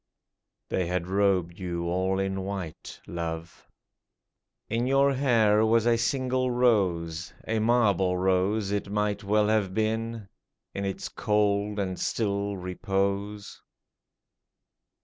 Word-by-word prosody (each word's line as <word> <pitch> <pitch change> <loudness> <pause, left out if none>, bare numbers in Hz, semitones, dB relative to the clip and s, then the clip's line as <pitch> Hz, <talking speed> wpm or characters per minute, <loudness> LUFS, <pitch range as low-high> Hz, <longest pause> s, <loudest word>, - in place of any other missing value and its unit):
They 90 -2 0
had 90 0 -1
robed 95 -2 +1
you 85 -2 -3
all 95 +2 0
in 95 0 -1
white, 95 -4 -6
love; 85 0 -6 1.0
In 115 +2 -1
your 135 +1 +4
hair 115 -6 +3
was 115 0 +3
a 120 -1 +4
single 130 +2 0
rose 90 - +1
— - - -19
A 110 0 0
marble 105 -6 +2
rose 95 +3 +1
it 100 -1 -2
might 105 0 -1
well 105 +1 +2
have 100 -4 +1
been 110 0 -1 0.5
In 100 - -3
its 95 - -3
cold 105 -1 0
and 95 -2 -2
still 100 -2 -1
repose 100 +2 -3
100 Hz, 120 wpm, -27 LUFS, 95-110 Hz, 1.0 s, your